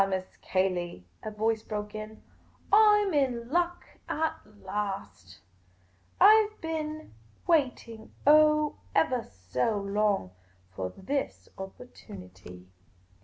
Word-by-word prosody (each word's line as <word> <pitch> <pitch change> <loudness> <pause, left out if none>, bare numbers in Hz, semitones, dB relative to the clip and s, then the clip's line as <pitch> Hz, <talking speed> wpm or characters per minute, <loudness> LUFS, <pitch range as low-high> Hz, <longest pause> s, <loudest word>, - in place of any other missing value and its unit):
Miss 185 -1 -4
Cayley," 180 - -1 0.2
a - - -5
voice 220 +1 0
broke 210 -1 -5
in; 215 0 -8 0.5
"I 420 -1 +7
'm 385 - -2
in 250 -5 0
luck 350 +1 0 0.2
at 320 0 0 0.3
last! 105 - -5 0.8
I 430 +1 +7
've 430 - -26
been 310 - -5 0.3
waiting, 250 -8 0
oh, 305 0 +5 0.2
evah 255 -7 +2
so 95 - -2
long, 200 - 0 0.4
for 95 0 -4
this 270 - -4
opportunity." 95 - -11
215 Hz, 105 wpm, -29 LUFS, 185-305 Hz, 0.8 s, I